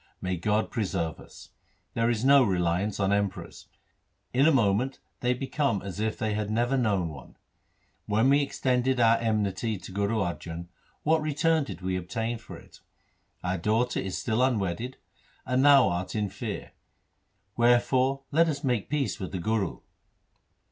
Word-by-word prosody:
May 90 0 -2
God 105 +5 0
preserve 90 -7 -2
us! - - -14 0.4
There 115 0 +1
is 120 +1 0
no 140 0 +7
reliance 90 0 0
on 100 0 +2
Emperors. 100 -2 -3 0.7
In 135 +4 +4
a - - +6
moment 125 0 +2 0.2
they 125 0 +1
become 135 -4 -1
as 100 0 -6
if 110 0 -1
they 110 -2 -1
had 105 -1 -2
never 120 +4 +1
known 100 -9 +1
one. 70 -5 -12 0.7
When 110 +4 +2
we 140 +1 +5
extended 130 -2 0
our 115 -1 +5
enmity 110 -1 -1
to 95 - -10
Guru 100 +3 0
Arjan, 85 -3 -4 0.3
what 160 +1 +3
return 155 +1 +1
did 90 - -8
we 90 0 -1
obtain 115 +6 -3
for 110 - -10
it? - - -17 0.6
Our 90 0 -1
daughter 110 +7 +1
is 95 -1 -3
still 110 +1 0
un 130 -2 +3
wedded, 100 +7 -3 0.5
and 130 +2 +1
thou 140 -6 +7
art 90 +4 -3
in 105 -2 0
fear. - - -6 0.8
Wherefore 130 +3 +3
let 165 +3 +4
us 145 -1 -3
make 125 -6 0
peace 145 -2 -1
with 95 - -5
the 95 - -3
Guru.' 105 -1 -1
110 Hz, 160 wpm, -27 LUFS, 95-130 Hz, 0.8 s, no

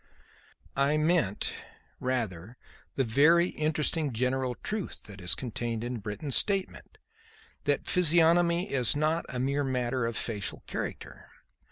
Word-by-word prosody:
"I 140 +2 +2
meant, 155 - +1 0.5
rather, 115 -4 -3 0.4
the 135 - +2
very 150 +9 +4
interesting 155 -1 0
general 125 +1 0
truth 215 -2 -4
that 100 -2 -10
is 90 - +3
contained 115 -2 -4
in 120 0 -4
Britton's 105 +7 -3
statement; 195 -2 -1 0.7
that 145 -1 +1
physiognomy 170 +1 +4
is 125 -1 +2
not 155 +3 0
a 125 - -4
mere 140 +3 0
matter 125 -2 -1
of 115 - -3
facial 105 -4 -2
character. - - -6
135 Hz, 125 wpm, -29 LUFS, 120-160 Hz, 0.7 s, very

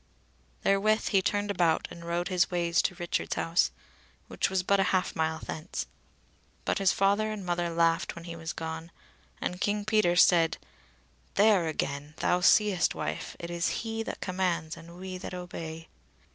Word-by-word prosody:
Therewith 215 +2 +2
he 195 - +4
turned 205 +1 0
about 170 -4 +2
and 170 - -10
rode 170 +1 -1
his 180 -2 +2
ways 170 -1 +2
to 180 - -1
Richard's 175 -1 -2
house, 165 +2 +2 0.6
which - - 0
was 190 -1 0
but 200 +2 +3
a - - +5
half 185 -1 0
mile 160 0 0
thence. 160 +1 -5 0.8
But - - 0
his 195 -1 +4
father 205 +2 +2
and 205 -3 -5
mother 175 -1 0
laughed 165 0 +1
when 170 - -9
he 170 -1 -7
was 165 0 -5
gone, 160 0 -5 0.5
and 180 +1 -3
King 205 0 0
Peter 215 -5 +3
said: 170 -2 +5 0.8
"There 205 -5 +5
again! 145 -1 -3
thou 180 - +2
seest, 195 0 +4
wife, - - -4
it 170 0 -6
is 170 +4 -1
he 225 0 -2
that 225 - -5
commands 180 -3 -1
and 170 +1 -12
we 185 0 -6
that 180 - -6
obey." 165 -2 -7
175 Hz, 170 wpm, -29 LUFS, 165-195 Hz, 0.8 s, a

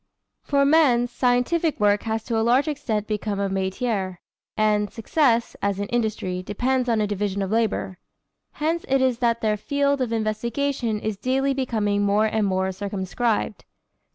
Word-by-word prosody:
For 280 -1 +2
men 275 -5 +4
scientific 250 +6 +1
work 205 0 +3
has 220 0 -1
to 235 - -3
a 225 - +2
large 245 +6 +3
extent 225 -8 -2
become 210 -1 -2
a 200 -1 0
métier, 190 0 -2 0.4
and 210 -1 +2
success, 235 0 +1
as 200 -1 0
in 205 - -1
industry, 215 -6 -1
depends 250 +6 -1
on 225 -2 +2
a - - +2
division 200 -1 -2
of 195 - -4
labor. 220 -5 -1 0.5
Hence 325 +3 -1
it 270 +1 +2
is 260 -2 +1
that 235 -1 +1
their 215 -1 +1
field 280 +4 0
of 245 -3 -1
investigation 230 +2 -1
is 215 -1 -3
daily 270 +4 0
becoming 215 -6 0
more 205 +1 +3
and 215 -1 +1
more 190 0 0
circumscribed. 200 +3 -2
220 Hz, 160 wpm, -24 LUFS, 205-255 Hz, 0.5 s, men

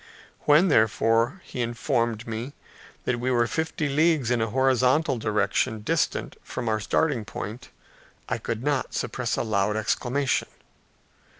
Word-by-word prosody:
When, 155 +6 +5
therefore, 115 - +2
he 125 - -5
informed 120 -1 -1
me 115 +4 -5 0.5
that 120 -1 0
we 125 +2 -1
were 120 -2 +3
fifty 160 +4 -2
leagues 150 -3 +2
in 120 -2 +2
a 110 - 0
horizontal 130 +2 +2
direction 110 +2 0
distant - - -1
from 120 - -5
our 110 -1 +1
starting 130 +2 0
point, 110 +3 -7 0.6
I - - -2
could 115 +1 -4
not 145 -2 -1
suppress 125 -2 -2
a - - 0
loud 105 -1 0
exclamation. 130 +5 0
120 Hz, 135 wpm, -25 LUFS, 110-135 Hz, 0.6 s, When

